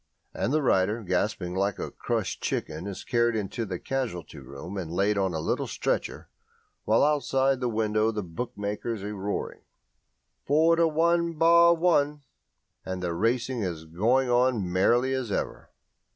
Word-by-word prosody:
And 125 - -1
the 155 0 +1
rider, 105 0 +2
gasping 90 -1 -1
like 100 +1 0
a - - -5
crushed - - -3
chicken, 80 +5 -3
is 100 - -6
carried 120 -1 +1
into 110 +2 -3
the 90 -2 -3
casualty 120 -10 -4
room 70 +8 -9
and 90 -5 -4
laid 100 +4 +1
on 95 -3 0
a - - -1
little - - -1
stretcher, - - -2 0.6
while 110 +5 +4
outside 135 -2 +2
the 125 -1 -1
window 110 -1 +1
the 105 -2 -3
bookmakers 105 +3 -4
are 105 +1 -4
roaring 100 0 -4 0.9
"Four 160 +4 +4
to 165 0 +4
one 170 +2 +2
bar 170 +1 +6
one," 150 -4 +1 0.6
and 95 -1 -5
the 85 -1 -1
racing 120 +6 0
is 85 -5 -4
going 115 +11 +1
on 120 -5 +2
merrily 120 +8 +3
as 130 -5 -2
ever. - - -3
110 Hz, 155 wpm, -27 LUFS, 95-135 Hz, 0.9 s, bar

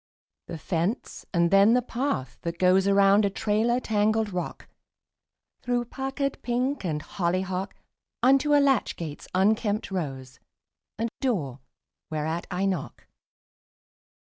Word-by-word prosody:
The 170 - -6
fence; 170 +7 -3
and 170 -2 +2
then 200 +4 +6
the 250 - +3
path 240 - -3
that 170 0 -4
goes 185 +2 +4
Around 200 +1 +5
a 200 - +2
trailer 220 +5 +1
tangled 215 -2 +1
rock, 180 -1 -5 0.9
Through 245 -1 -1
puckered 270 +2 -3
pink 250 +3 -1
and 155 -4 -2
hollyhock, 185 +1 -2 0.5
Unto 275 +3 +4
a - - +6
latch 275 -5 +2
gate's 155 -4 -7
unkempt 210 +2 +1
rose, 135 -8 -5 0.6
And 230 0 -2
door 155 - -1 0.5
whereat 160 +2 -3
I 185 +2 -1
knock. 185 -7 -3
200 Hz, 120 wpm, -26 LUFS, 170-240 Hz, 0.9 s, then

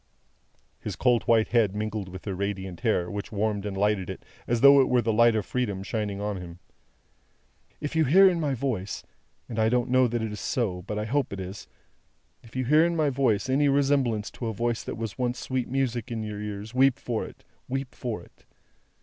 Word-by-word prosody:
His - - -5
cold 125 -2 +3
white 115 -2 +4
head 110 -5 +2
mingled 105 -2 -3
with 95 0 -10
her 100 - -2
radiant 95 -1 -4
hair, 100 -7 0
which 100 0 -5
warmed 105 -1 -1
and 95 -1 -4
lighted 100 -2 +1
it - - -7 0.2
as 120 -1 0
though 140 0 +8
it 130 - +1
were 125 - +4
the 110 0 +1
light 115 +1 +5
of 105 -3 0
Freedom 105 -7 -2
shining 105 -1 -3
on 105 -1 -2
him. 85 -1 -9 1.2
"If 150 +1 -4
you 160 -1 +4
hear 190 +8 +7
in 180 -2 +2
my 145 -4 0
voice 115 -7 -3 0.5
I 110 0 +2
don't 125 +1 +1
know 130 0 +5
that 120 -1 -2
it 110 - -3
is 105 - -6
so, 100 -8 -1
but 105 +3 -5
I 105 - -2
hope 140 +5 0
it 100 - -5
is 95 +2 -7 0.7
if 115 - -17
you 130 0 -1
hear 150 +5 +5
in 170 0 +1
my 155 -3 +2
voice 125 -4 +1
any 140 +2 +3
resemblance 135 -6 +1
to 120 - -5
a 110 - -2
voice 120 +1 -1
that - - -4
once 115 -3 -5
was 125 0 0
sweet 130 -2 -2
music 125 -3 -1
in 110 -2 -3
your 105 -1 -5
ears, 105 +2 -6
weep 130 0 +4
for 115 -3 -3
it, - - -11 0.2
weep 135 0 -3
for 110 -8 -4
it! - - -22
115 Hz, 215 wpm, -27 LUFS, 105-130 Hz, 1.2 s, though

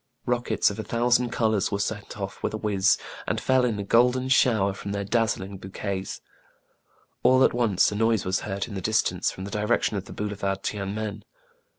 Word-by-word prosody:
Rockets 120 -3 +1
of 100 - -7
a - - -2
thousand 120 +2 +2
colors 110 -4 +1
were 100 - 0
sent 105 0 -4
off 100 0 -5
with - - -2
a - - -2
whizz, 100 -3 +2 0.3
and - - 0
fell 130 -1 +2
in 115 -4 0
a 100 - -3
golden 125 +5 +3
shower 110 -7 +3
from 100 +1 -6
their 100 0 -2
dazzling 100 -3 -1
bou 95 - -9
quets. 95 -1 -4 1.0
All 130 +1 +5
at - - +4
once 115 -7 +2
a - - -4
noise 110 -1 +2
was 95 +1 +1
heard 100 -1 -3
in 110 - -9
the 95 - -4
distance, 110 +4 +1
from 95 - -7
the 100 - -7
direction 105 0 0
of 95 - -5
the - - -10
boulevard 100 -2 -3
Tiene 100 -1 -3
Men. 105 -1 -4
105 Hz, 205 wpm, -26 LUFS, 100-115 Hz, 1.0 s, All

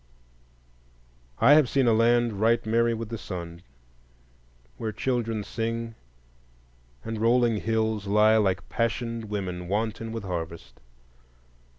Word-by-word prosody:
I 145 - +6
have 150 -5 +5
seen 135 -2 +2
a 115 - +4
land 115 -1 +2
right 115 +1 +2
merry 115 +1 +2
with 115 -1 -6
the 115 -2 -5
sun, 85 -2 -7 1.2
where 110 - -3
children 115 -3 -2
sing, 115 +1 -4 1.1
and 110 -1 -5
rolling 120 -1 +3
hills 110 -1 -1
lie 105 +2 +4
like 95 -4 0
passioned 115 0 -2
women 95 -4 -4
wanton 110 +3 -2
with 115 -2 -5
harvest. 85 -3 -6
110 Hz, 115 wpm, -26 LUFS, 105-115 Hz, 1.2 s, I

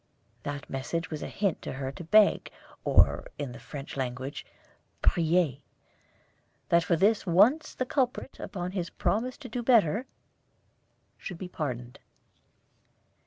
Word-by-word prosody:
That 145 0 -5
message 165 +6 -3
was 155 - -4
a - - -4
hint 200 -5 -1
to - - -5
her 135 0 -4
to 155 - -9
beg 210 +5 +4 0.3
or, - - +4
in 145 -4 -4
the 120 - -9
French 140 -2 -8
language, 130 +1 -4 0.6
prier 165 -4 +3 1.1
that 170 0 +5
for 170 - +2
this 200 +4 +2
once 225 - +4
the 255 - -1
culprit, 255 0 -1
upon 180 -2 -4
his 180 -3 -3
promise 245 +5 -1
to 275 - -9
do 245 +1 -3
better, 230 -1 +3 1.1
should 180 - -6
be 185 - -6
pardoned. 125 -7 -4
170 Hz, 135 wpm, -29 LUFS, 145-215 Hz, 1.1 s, that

